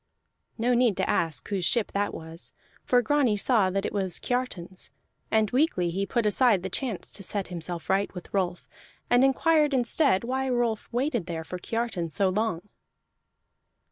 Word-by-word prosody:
No 245 +2 +2
need 240 -5 +3
to - - +1
ask 160 -6 -1
whose 195 -3 -1
ship 220 +5 +2
that 205 +1 0
was, 160 +1 -9 0.3
for 245 -1 +3
Grani 255 -4 +2
saw 210 -3 +3
that 195 +1 -1
it - - -3
was 190 -3 -1
Kiartan's. 195 -8 -3 0.4
And 220 -2 +2
weakly 245 - +1
he 195 +3 -2
put 235 +1 0
aside 210 -3 +3
the 190 - -4
chance 230 -2 -3
to - - -8
set 195 +1 -3
himself 170 -2 -5
right 195 +1 +1
with 180 - -9
Rolf, 180 -3 -1 0.4
and 245 +1 +5
inquired 295 +2 +3
instead 245 -3 +2
why 265 +2 -1
Rolf 240 -3 -1
waited 240 - -1
there 165 -2 -4
for 180 +2 -7
Kiartan 225 -6 -2
so 195 +4 +1
long. 195 -2 -1
210 Hz, 170 wpm, -27 LUFS, 180-245 Hz, 0.4 s, and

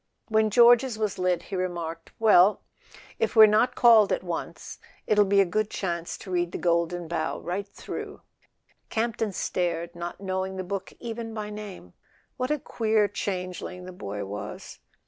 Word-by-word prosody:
When 220 -1 +3
George's 240 +2 +5
was 210 -3 -2
lit 180 -2 +1
he 195 - -6
remarked: 170 -3 -4
"Well, 210 -3 +5 0.6
if - - 0
we're 220 -1 +10
not 215 +4 +3
called 225 -4 +6
at - - 0
once 175 -2 -6 0.3
it'll 210 -1 +4
be 200 0 +3
a - - +3
good 215 +4 -1
chance 170 -5 -3
to 190 - -10
read 175 -1 0
'The - - -4
Golden 170 0 0
Bough' 170 +1 -2
right 190 +4 -3
through." - - -8 0.7
Campton 225 -1 -1
stared, 170 -2 -2
not 175 +1 -6
knowing 190 -1 -3
the 185 - -3
book 195 +1 -5
even 230 -1 -6
by 210 -1 -5
name. 205 - -9 0.5
WQiat 255 +1 -1
a 300 - +1
queer 220 -5 +1
changeling 180 -2 -5
the 185 - -8
boy 100 - -6
was! 100 +1 -7
190 Hz, 165 wpm, -26 LUFS, 175-215 Hz, 0.7 s, we're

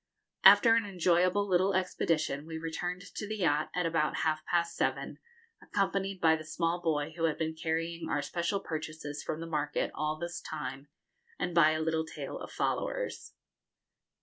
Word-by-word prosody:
After 230 -2 +9
an 230 0 +3
enjoyable 185 +1 +2
little 190 +1 +3
expedition 160 -5 0
we 160 -1 -5
returned 175 +3 -4
to 210 - -5
the 215 +1 -3
yacht 155 -5 +1
at 180 -1 +1
about 165 -2 +1
half 155 -1 +1
past 170 -1 +1
seven, - - -1 0.4
accompanied 195 -1 -1
by 160 -2 +5
the 155 - -6
small 165 +2 -1
boy 155 -2 0
who 165 -1 0
had 160 - 0
been 160 0 -1
carrying 165 +1 -2
our 145 - 0
special 170 +6 -1
purchases 155 -3 -5
from 155 - -4
the - - -4
market 150 -2 -1
all 155 +1 -1
this 170 +1 -5
time, 135 -2 -6 0.5
and 175 - -2
by 165 -2 +6
a 155 - -1
little 160 0 0
tail 160 - -6
of - - -8
followers. - - -2
165 Hz, 170 wpm, -31 LUFS, 155-180 Hz, 0.5 s, After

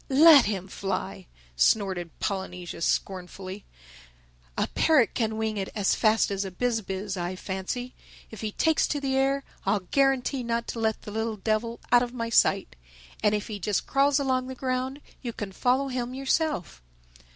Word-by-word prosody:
"Let 295 +2 +8
him 195 -3 -2
fly," 95 - -4 0.3
snorted 180 - +2
Polynesia 180 -4 -4
scornfully. 185 +2 -3 0.9
"A - - +2
parrot 305 -8 +4
can 220 -2 -1
wing 220 -1 -1
it 195 -1 -2
as 205 -3 +2
fast 220 -1 +3
as 200 0 -1
a 195 - -4
Biz 225 +5 -1
biz, 195 0 -4
I 175 +1 -3
fancy. 190 +7 -4 0.4
If 220 - -9
he 215 -1 -2
takes 320 +8 +2
to 290 - -1
the 270 -1 -1
air, 275 +1 +2 0.2
I'll 195 +1 +1
guarantee 270 +5 +1
not 235 -1 -1
to 230 - -4
let 220 -1 0
the 210 - -7
little 220 0 -2
devil 220 +3 -1
out 245 0 +7
of 245 0 -3
my 230 -1 -3
sight. 140 - +3 0.5
And 210 0 +3
if 210 - -2
he 210 -2 -5
just 200 +2 -1
crawls 280 +1 +3
along 260 -2 0
the 260 - -6
ground 260 +2 -2 0.2
you 240 -3 -4
can 205 -3 -5
follow 255 +7 +1
him 250 0 -3
yourself." 270 - -1
220 Hz, 175 wpm, -27 LUFS, 195-260 Hz, 0.9 s, Let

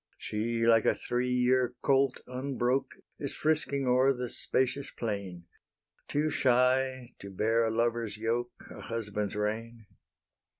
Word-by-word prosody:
She, 115 +2 -2
like 115 -1 +5
a - - +3
three 125 +1 -2
year 125 0 +2
colt 135 -2 +2
unbroke, 130 0 -1 0.2
Is 140 - -4
frisking 150 -3 0
o'er 130 +2 +4
the 125 -1 -4
spacious 130 +4 -1
plain, 100 -6 -5 0.6
Too 150 +2 0
shy 130 0 +2
to 100 - -9
bear 115 +4 +1
a - - +1
lover's 115 -1 -1
yoke, 120 +2 -3
A - - -9
husband's 105 -3 -3
rein. 110 +2 -3
120 Hz, 130 wpm, -30 LUFS, 115-130 Hz, 0.6 s, like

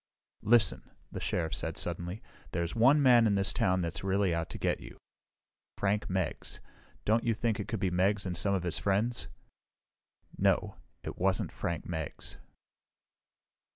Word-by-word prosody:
"Listen," 105 - +3 0.2
the - - -5
Sheriff 80 -2 -1
said - - -3
suddenly, 90 +5 -3 0.3
"there's 85 0 -1
one 135 +6 +5
man 120 -3 +6
in 100 - +2
this 100 -1 +1
town 90 -1 +2
that's 85 +1 -3
really 95 -1 +1
out 85 0 -2
to - - -6
get - - 0
you: - - -11 0.8
Frank 105 +1 0
Meggs. 95 -3 -2 0.5
Don't 110 +2 +3
you 115 -1 +1
think 115 -1 -1
it 105 - -4
could 115 - -3
be 95 -2 0
Meggs 95 +3 +1
and 90 -2 -2
some 100 +3 +3
of 90 - -2
his 85 -2 -1
friends?" 105 +5 +1 1.1
"No. - - +2 0.3
It - - -6
wasn't 95 0 +1
Frank 85 -2 -3
Meggs." 80 -4 -4
95 Hz, 155 wpm, -31 LUFS, 90-110 Hz, 1.1 s, man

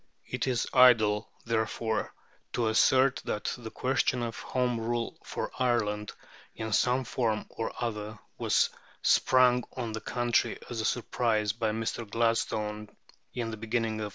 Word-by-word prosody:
It 125 0 -3
is 125 -3 +1
idle, 115 -5 +5 0.2
therefore, 110 -1 -1 0.4
to 115 -2 +1
assert 130 +4 +4
that 105 - -2
the 115 -2 -8
question 130 0 0
of 115 -1 -4
Home 125 -2 -1
Rule 115 +1 -2
for - - -4
Ireland, 105 -4 0 0.4
in 110 -1 -4
some 125 +4 +3
form 115 -3 -1
or 115 - -4
other, 110 -2 -3 0.2
was - - +2 0.3
sprung 125 -1 +4
on 120 -3 -3
the 110 0 -5
country 120 -1 0
as 115 -2 -2
a - - -2
surprise 110 -3 0
by 115 -1 -1
Mr. 115 0 -3
Gladstone 105 -2 0 0.5
in 115 -2 -2
the 110 - -6
beginning 115 0 -1
of - - -1
1886. - - -5
115 Hz, 150 wpm, -29 LUFS, 110-125 Hz, 0.5 s, idle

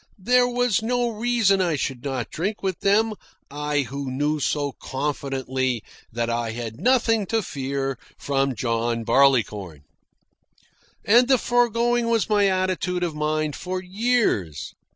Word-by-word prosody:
There 245 +5 +3
was 245 -2 +1
no 240 +1 0
reason 225 -3 +2
I 170 -4 +1
should 135 -3 -3
not 135 -4 -3
drink 200 +6 -3
with 190 -3 -2
them 215 +3 +2 0.4
I 150 0 -1
who 135 +1 -5
knew 145 +4 -1
so 145 0 -1
confidently 130 -3 -3 0.3
that 115 +1 -2
I 115 -1 -2
had 115 -1 -6
nothing 230 -5 +2
to 225 +1 0
fear 135 -3 -3 0.2
from 135 -2 0
John 115 0 -1
Barleycorn. 110 - +2 1.2
And 240 +4 +5
the 265 -1 +5
foregoing 240 0 +1
was 230 -2 +1
my 205 -1 +4
attitude 185 -1 0
of 170 -3 -1
mind 150 0 -1
for 185 0 -4
years. 185 - -1
155 Hz, 135 wpm, -23 LUFS, 130-220 Hz, 1.2 s, And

